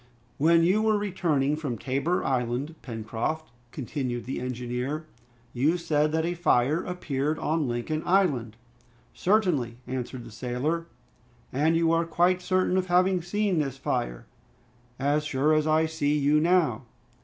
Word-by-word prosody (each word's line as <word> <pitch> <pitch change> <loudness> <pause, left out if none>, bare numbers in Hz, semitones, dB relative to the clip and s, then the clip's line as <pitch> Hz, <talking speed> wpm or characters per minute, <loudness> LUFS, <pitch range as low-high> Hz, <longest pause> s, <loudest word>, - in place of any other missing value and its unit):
"When 165 +3 +5
you 190 +5 +3
were 220 -1 +3
returning 165 -8 0
from 145 -6 -4
Tabor 140 - -1
Island, 130 +3 -1
Pencroft," 115 +7 -4 0.2
continued 125 -3 -4
the 130 - -3
engineer, 125 +4 -3 0.5
"you 145 +8 +2
said 155 -3 +1
that 160 +1 0
a 175 - -1
fire 155 -2 +2
appeared 155 -4 -2
on 155 -2 0
Lincoln 120 +6 -2
Island?" 140 - +1 0.6
"Certainly," 175 - +1
answered 125 -1 -5
the - - -11
sailor. 135 +9 -2 0.7
"And 155 +5 +2
you 165 -1 +3
are 165 0 +2
quite 175 +2 +2
certain 185 0 +1
of 185 0 0
having 180 +1 +3
seen 195 0 0
this 135 -3 -2
fire?" - - -2 0.7
"As 145 +3 +1
sure 150 +1 +1
as 155 0 +2
I 155 +1 +3
see 150 -2 0
you 145 +1 +3
now." 155 -8 +2
150 Hz, 145 wpm, -27 LUFS, 130-170 Hz, 0.7 s, When